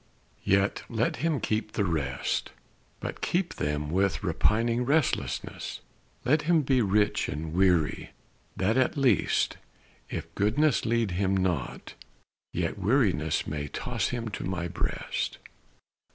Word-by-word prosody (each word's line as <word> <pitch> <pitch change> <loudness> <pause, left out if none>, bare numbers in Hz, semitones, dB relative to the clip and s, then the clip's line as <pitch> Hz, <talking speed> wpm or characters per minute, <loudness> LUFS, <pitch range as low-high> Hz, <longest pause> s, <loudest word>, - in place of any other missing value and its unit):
Yet 95 +1 +2
let 115 0 0
him 160 -2 0
keep 110 -1 -1
the 100 - +1
rest, 70 -8 -1 0.5
But - - -5
keep 175 0 0
them 75 +1 -2
with 95 +3 +1
repining 115 +6 +2
restlessness: 145 +3 -1 0.4
Let 145 +5 +4
him 160 -1 +3
be 130 -2 +3
rich 105 0 +2
and 80 +2 -4
weary, 90 -4 +2 0.5
that 105 +6 +2
at 130 +2 +2
least, 125 - +2 0.5
If - - -5
goodness 120 +9 +2
lead 115 -3 +1
him 95 +2 +1
not, 95 -2 -2 0.6
yet 85 +3 -2
weariness 95 - +2
May 75 -1 -3
toss - - -2
him 115 -2 -3
to 100 - -5
My 90 -2 -2
breast. - - -2
100 Hz, 125 wpm, -28 LUFS, 85-125 Hz, 0.6 s, Let